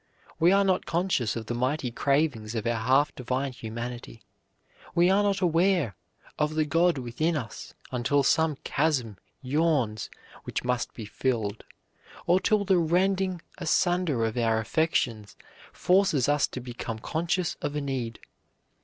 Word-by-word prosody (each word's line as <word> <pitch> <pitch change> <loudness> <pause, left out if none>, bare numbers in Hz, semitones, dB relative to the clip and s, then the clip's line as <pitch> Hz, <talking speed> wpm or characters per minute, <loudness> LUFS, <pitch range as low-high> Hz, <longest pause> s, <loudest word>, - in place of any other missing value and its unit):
We 170 +2 +5
are 200 +1 +5
not 185 -2 +1
conscious 170 - 0
of 115 -1 -4
the 120 - -3
mighty 130 +2 -1
cravings 135 -5 0
of 110 - -2
our 120 - +1
half 130 +6 +3
divine 130 +2 -2
humanity; 120 0 -7 0.7
we 175 +2 +5
are 200 +2 +4
not 200 -1 +1
aware 175 - +2 0.4
of 150 0 0
the 155 -1 +2
God 165 +2 +2
within 145 +7 -1
us 115 -6 -7 0.2
until 130 +3 +1
some 160 +2 +2
chasm 130 -9 0 0.2
yawns 130 - 0 0.3
which - - -4
must 125 0 -1
be 110 - -7
filled, 110 -1 -2 0.6
or 180 +2 +4
till 210 0 +2
the 190 -2 +4
rending 185 +2 +1 0.2
asunder 175 -6 +1
of 110 +1 -3
our 115 -2 +2
affections 115 - -1 0.4
forces 180 -8 +2
us 145 0 +3
to - - -7
become 120 -2 -6
conscious 170 +7 -1
of 145 - -3
a - - 0
need. 130 -5 -3
140 Hz, 145 wpm, -27 LUFS, 120-170 Hz, 0.7 s, We